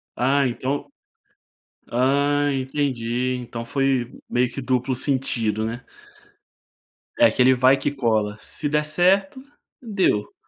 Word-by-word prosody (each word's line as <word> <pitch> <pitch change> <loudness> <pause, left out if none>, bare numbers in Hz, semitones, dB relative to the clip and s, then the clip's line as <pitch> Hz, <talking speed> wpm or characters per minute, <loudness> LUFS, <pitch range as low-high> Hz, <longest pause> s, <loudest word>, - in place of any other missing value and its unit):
Ah 135 +2 +2
então 130 - -3 1.0
ah 140 +3 +2
entendi, 130 -2 -1
então 120 -1 -6
foi 135 -2 0 0.2
meio 125 0 +1
que 135 - -6
duplo 130 0 0
sentido 115 -5 -1
né. 120 +3 -5 1.4
É 295 - +7
aquele 130 - +4
vai 130 +2 +4
que 135 - -2
cola, 110 -6 0
se 150 +6 -5
der 150 +1 +1
certo, 185 +8 +2 0.4
deu. 195 - 0
130 Hz, 115 wpm, -23 LUFS, 120-145 Hz, 1.4 s, É